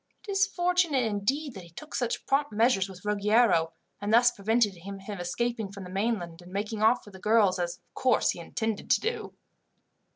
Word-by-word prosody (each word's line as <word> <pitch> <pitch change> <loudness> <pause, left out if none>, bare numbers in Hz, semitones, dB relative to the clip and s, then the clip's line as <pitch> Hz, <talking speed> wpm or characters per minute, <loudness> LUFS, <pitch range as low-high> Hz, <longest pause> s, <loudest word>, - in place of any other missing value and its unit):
It - - -3
is 390 0 +3
fortunate 350 -7 +1
indeed 235 +7 -1
that 195 - -8
he 170 - -14
took 300 - -11
such 245 -2 -2
prompt 285 +2 +1
measures 210 -3 +2
with 185 +1 -12
Ruggiero, 210 -5 +3 0.3
and 205 +1 -2
thus 240 +2 +6
prevented 220 0 +1
his 195 +3 -9
escaping 205 +3 -3
from 200 -1 -8
the 180 - -9
mainland, 190 -4 -2
and 175 +1 -14
making 210 +2 -3
off 230 +3 +3
with 205 - -14
the 190 - -11
girls, 210 -3 +3
as 175 0 -2
of - - -42
course 255 -3 +2
he - - -8
intended 220 +5 -3
to - - +4
do." 460 +3 -4
215 Hz, 195 wpm, -28 LUFS, 190-245 Hz, 0.3 s, thus